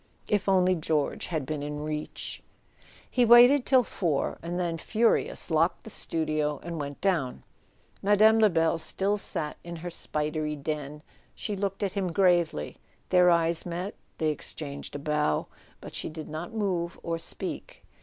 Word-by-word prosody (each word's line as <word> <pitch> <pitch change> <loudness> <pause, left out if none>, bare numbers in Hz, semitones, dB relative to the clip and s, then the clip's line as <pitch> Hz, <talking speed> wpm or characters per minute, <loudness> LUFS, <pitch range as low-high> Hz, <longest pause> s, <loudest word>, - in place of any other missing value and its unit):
If 205 -1 +1
only 185 -1 +4
George 155 -3 -1
had 155 -5 -2
been 150 +1 -3
in 150 +1 -4
reach! 150 0 -5 0.7
He 250 - +2
waited 245 +3 +7
till 260 -2 +5
four, 170 -9 -1
and 175 +2 -3
then, 170 -2 -1
furious, 225 -3 +1
locked 165 +2 +2
the 220 - -9
studio 155 -4 -1
and 170 0 -5
went 145 -1 -5
down. 165 -10 0 0.6
Mme. 215 +2 +5
Lebel 165 -6 +3
still 200 +5 -1
sat 150 -5 -3
in 170 0 -7
her 175 +1 -6
spidery 150 -1 -2
den. 150 0 -5 0.3
She 210 - -3
looked 195 +1 -2
at 195 - -1
him 190 -4 -1
gravely, 175 - +2 0.3
their 180 -1 +6
eyes 170 -1 +3
met, 180 +4 -4 0.2
they 155 - +1
exchanged 145 -1 -5
a - - -1
bow, 150 - 0 0.4
but - - -9
she - - -3
did 155 -1 -8
not 160 +7 -5
move 185 -6 -2
or 165 0 -2
speak. - - -6
170 Hz, 155 wpm, -28 LUFS, 150-195 Hz, 0.7 s, waited